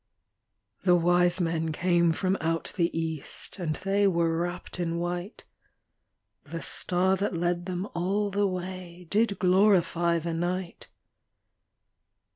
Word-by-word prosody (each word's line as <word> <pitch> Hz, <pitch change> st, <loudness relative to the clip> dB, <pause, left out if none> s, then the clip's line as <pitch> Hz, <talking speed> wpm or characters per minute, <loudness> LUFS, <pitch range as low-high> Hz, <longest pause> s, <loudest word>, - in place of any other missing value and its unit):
The 180 Hz, -1 st, +5 dB
wise 175 Hz, +1 st, +3 dB
men 165 Hz, -2 st, 0 dB
came 170 Hz, +1 st, +2 dB
from 185 Hz, +3 st, 0 dB
out 165 Hz, 0 st, -1 dB
the 170 Hz, -3 st, +2 dB
east, 160 Hz, +3 st, -5 dB
And 160 Hz, -4 st, -1 dB
they 195 Hz, +3 st, +1 dB
were 170 Hz, -3 st, +2 dB
wrapped 175 Hz, +2 st, -4 dB
in 170 Hz, -1 st, -1 dB
white; 175 Hz, +4 st, -4 dB, 1.0 s
The 165 Hz, +2 st, -7 dB
star 185 Hz, +1 st, +1 dB
that 195 Hz, -2 st, -1 dB
led 175 Hz, +1 st, -1 dB
them 185 Hz, +2 st, -3 dB
all 200 Hz, +4 st, 0 dB
the 200 Hz, 0 st, +2 dB
way 180 Hz, -1 st, -6 dB
Did 210 Hz, -1 st, +2 dB
glorify 180 Hz, -3 st, +3 dB
the 165 Hz, 0 st, -3 dB
night. 175 Hz, +1 st, -3 dB
175 Hz, 125 wpm, -27 LUFS, 170-185 Hz, 1.0 s, The